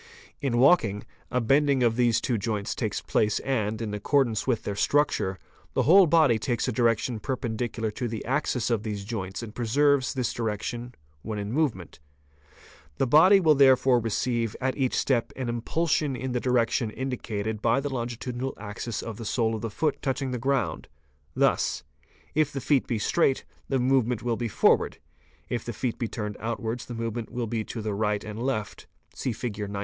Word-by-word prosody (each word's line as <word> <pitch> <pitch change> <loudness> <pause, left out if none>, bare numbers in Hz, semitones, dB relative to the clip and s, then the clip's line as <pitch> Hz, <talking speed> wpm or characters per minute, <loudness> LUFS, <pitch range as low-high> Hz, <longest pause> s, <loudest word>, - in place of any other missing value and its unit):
In 135 -5 0
walking, 120 - +4 0.3
a 125 - +1
bending 135 +2 +3
of 115 -1 +3
these 120 -2 +3
two 120 -4 -1
joints 105 -1 -2
takes - - -2
place 105 -1 +1
and, 110 -5 -1
in 105 -2 -4
accordance 115 +2 +1
with 125 -4 +1
their 100 - -3
structure, 105 -6 +1 0.4
the - - +3
whole 185 +3 +7
body 150 -8 +4
takes 120 +3 -1
a - - +1
direction 115 0 +1
perpendicular 115 -2 -3
to 120 +3 -3
the 110 -2 -5
axis 125 -2 0
of 115 -3 +1
these 105 -2 -4
joints 95 -1 -4
and 110 -2 -8
preserves 130 +4 +2
this 125 -2 -1
direction 115 +2 -4 0.3
when 110 +4 -5
in 100 +1 -4
movement. 120 - -1 1.0
The - - +2
body 165 +10 +7
will 160 -4 +5
therefore 130 -2 +5
receive 115 0 -1
at 130 0 -1
each 130 -3 0
step 125 -4 +1
an 130 -2 -4
impulsion 145 +4 0
in 130 +1 -4
the 125 - 0
direction 120 -1 +1
indicated 110 -4 -4
by 115 +3 +3
the 140 0 -3
longitudinal 120 +1 -4
axis 105 +2 -5
of 115 -3 -6
the 115 - -7
sole 115 0 +1
of 110 - -4
the 115 - -3
foot 150 +7 -1
touching 135 -1 -1
the 125 - -3
ground, 135 +2 -1 0.5
thus: - - +1 0.5
if 155 -1 +2
the 140 - -4
feet 135 0 +1
be 120 - -1
straight, 135 +5 +1 0.2
the 135 - +2
movement 125 -3 +1
will 120 -1 0
be 120 +1 -2
forward, 105 - +2 0.5
if 120 -2 -3
the 120 - -5
feet 120 +2 -3
be 115 - -1
turned 105 -2 -5
Fig. - - -17
95. 115 +2 -2
outwards 115 +1 -4
the 120 - -6
movement 115 0 -4
will 120 -1 -2
be 115 0 -2
to 115 - -6
the 105 -1 -2
right 105 0 0
and 105 +1 -7
the - - -3
left; 125 -6 -3 0.3
see 130 - -2
Fig. 110 -1 -4
95. 100 -1 -4
120 Hz, 190 wpm, -27 LUFS, 110-130 Hz, 1.0 s, whole